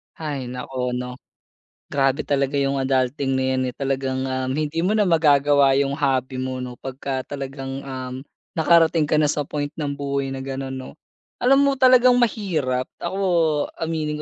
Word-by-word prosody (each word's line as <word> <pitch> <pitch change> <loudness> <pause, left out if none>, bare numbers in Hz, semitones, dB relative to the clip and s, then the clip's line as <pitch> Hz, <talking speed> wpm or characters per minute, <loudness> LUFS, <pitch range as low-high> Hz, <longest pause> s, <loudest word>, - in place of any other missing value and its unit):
Hay, 145 -5 -4
naku, 125 0 -4
no? 125 0 -5 0.7
Grabe 135 -1 +1
talaga 140 -1 0
yung 140 0 +1
adulting 135 0 0
na 130 - 0
yan, 130 - 0
eh. - - -8
Talagang, 135 -1 -2
um, 130 0 -2
hindi 155 +1 -2
mo 195 +5 +1
na 215 - +4
magagawa 145 -4 +4
yung 140 0 +1
hobby 135 -3 0
mo, 130 0 -3
no? 125 -1 -8
Pagka 135 0 -4
talagang, 135 0 -6
um, 130 -2 -6 0.4
nakarating 165 -1 +4
ka 150 +1 +2
na 150 - +3
sa 150 0 0
point 145 0 -3
ng 145 -3 -2
buhay 140 -1 -2
na 135 - -4
ganun, 135 0 -5
no? 130 0 -8 0.5
Alam 270 +2 +5
mo 280 - +3
talagang 255 -1 +6
mahirap. 160 - 0 0.2
Ako 180 +3 -3 0.6
aminin 160 -2 -2
140 Hz, 165 wpm, -22 LUFS, 130-155 Hz, 0.7 s, talagang